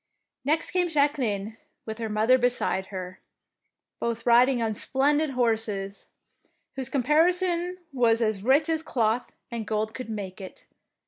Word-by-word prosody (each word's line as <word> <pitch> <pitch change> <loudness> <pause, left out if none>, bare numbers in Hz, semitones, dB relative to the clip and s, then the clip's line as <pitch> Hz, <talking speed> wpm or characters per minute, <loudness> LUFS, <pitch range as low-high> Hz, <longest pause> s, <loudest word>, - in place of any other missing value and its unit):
Next 310 +4 0
came 360 -1 +1
Jacqueline 240 -9 0 0.3
with 220 0 -6
her 225 -1 -3
mother 220 +5 +3
beside 240 -6 0
her, 185 -1 -7 0.8
both 230 -1 -3
riding 245 +2 +5
on 225 -1 0
splendid 290 +7 +1
horses, 220 -6 -1 0.7
whose 265 -2 -4
caparison 345 +6 +2 0.2
was 235 -3 +3
as 215 -4 0
rich 275 +8 +3
as 320 -1 0
cloth 235 -5 -1 0.2
and 230 -3 -4
gold 215 0 -1
could 255 -3 -7
make 200 -3 -6
it. 190 - -11
235 Hz, 135 wpm, -26 LUFS, 215-285 Hz, 0.8 s, riding